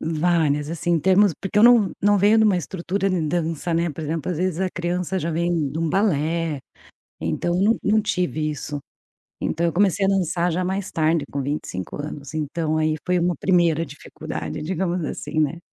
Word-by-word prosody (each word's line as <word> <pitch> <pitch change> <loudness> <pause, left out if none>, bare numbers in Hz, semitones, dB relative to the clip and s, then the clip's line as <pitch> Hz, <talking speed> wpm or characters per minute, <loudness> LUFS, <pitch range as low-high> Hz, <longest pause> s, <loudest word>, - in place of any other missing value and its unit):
Várias 155 -2 +1
assim, 170 +1 -2
em 165 - +2
termos 190 +2 +4
porque 195 +2 -2
eu 210 - +6
não 235 -5 +6
não 205 +1 +4
venho 205 +3 +4
de 220 - +5
uma 205 -4 +4
estrutura 190 +3 -2
de 185 -2 0
dança, 165 0 -1
né, 170 0 +1
por 160 - -7
exemplo, 155 +1 -3
às 170 - -3
vezes 185 -1 -1
a 190 -1 0
criança 180 +2 -2
já 170 0 -2
vem 170 -3 0
de 160 - -4
um 165 - 0
balé, 165 -5 0 0.6
então 175 0 -1
não 220 +4 +3
não 215 +1 +3
tive 175 -6 -1
isso. 145 -1 -5 0.6
Então 170 +2 -1
eu 170 - 0
comecei 195 +1 +2
a - - +1
dançar 180 -2 +1
já 180 +2 -1
mais 190 +1 -2
tarde, 155 -2 +1
com 140 -1 -2
25 130 -10 -4
anos, 145 0 -7
então 155 +1 -1
aí 155 0 +1
foi 180 -1 +1
uma 175 0 +1
primeira 170 -1 +2
dificuldade, 145 +1 -7
digamos 175 0 -1
assim, 155 - -4
né, 155 +2 +1
170 Hz, 195 wpm, -23 LUFS, 155-185 Hz, 0.6 s, eu